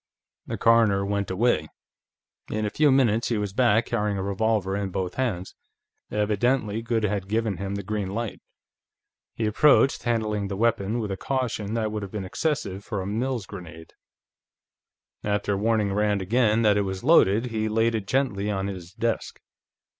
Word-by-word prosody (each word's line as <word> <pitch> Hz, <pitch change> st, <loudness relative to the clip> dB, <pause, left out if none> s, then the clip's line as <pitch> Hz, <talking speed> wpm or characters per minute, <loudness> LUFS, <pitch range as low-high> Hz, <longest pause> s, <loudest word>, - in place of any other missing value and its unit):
The -, -, -3 dB
coroner 110 Hz, -4 st, +4 dB
went 100 Hz, 0 st, -1 dB
away. 95 Hz, -5 st, +1 dB, 0.8 s
In 110 Hz, 0 st, -1 dB
a 105 Hz, -, -2 dB
few 150 Hz, -1 st, +3 dB
minutes 120 Hz, -4 st, +3 dB
he 115 Hz, -, 0 dB
was 105 Hz, -2 st, -3 dB
back, 120 Hz, -1 st, +3 dB
carrying 105 Hz, -3 st, -1 dB
a 95 Hz, -, -2 dB
revolver 100 Hz, 0 st, 0 dB
in 100 Hz, -1 st, -2 dB
both 95 Hz, -1 st, -3 dB
hands. 105 Hz, -9 st, -2 dB, 0.6 s
Evidently 105 Hz, +2 st, 0 dB
Goode 115 Hz, -1 st, -1 dB
had 100 Hz, -2 st, -1 dB
given 110 Hz, -2 st, -1 dB
him 100 Hz, 0 st, -4 dB
the 100 Hz, -, -4 dB
green 105 Hz, -1 st, -3 dB
light. 115 Hz, +2 st, -4 dB, 0.9 s
He 115 Hz, -, -1 dB
approached, 135 Hz, +5 st, +4 dB
handling 110 Hz, -4 st, -1 dB
the 100 Hz, -1 st, -4 dB
weapon 115 Hz, -1 st, +1 dB
with 110 Hz, -4 st, -3 dB
a 95 Hz, -, -3 dB
caution 115 Hz, -4 st, -2 dB
that 110 Hz, -2 st, -1 dB
would 105 Hz, 0 st, -3 dB
have 100 Hz, -2 st, -7 dB
been 105 Hz, -3 st, -4 dB
excessive 100 Hz, -, -2 dB
for 105 Hz, -1 st, -4 dB
a 95 Hz, -, -4 dB
Mills 115 Hz, +2 st, -2 dB
grenade; 85 Hz, -5 st, -10 dB, 1.3 s
after 105 Hz, 0 st, 0 dB
warning 105 Hz, -1 st, +1 dB
Rand 105 Hz, 0 st, +1 dB
again 115 Hz, +2 st, +2 dB
that 105 Hz, -2 st, +4 dB
it -, -, +3 dB
was 95 Hz, -1 st, -4 dB
loaded, 120 Hz, -, +4 dB
he 110 Hz, -1 st, -1 dB
laid 115 Hz, +2 st, +2 dB
it 105 Hz, -3 st, -3 dB
gently 105 Hz, -6 st, 0 dB
on 95 Hz, -2 st, -1 dB
his 90 Hz, -2 st, -7 dB
desk. 115 Hz, +1 st, -2 dB
105 Hz, 170 wpm, -25 LUFS, 100-115 Hz, 1.3 s, coroner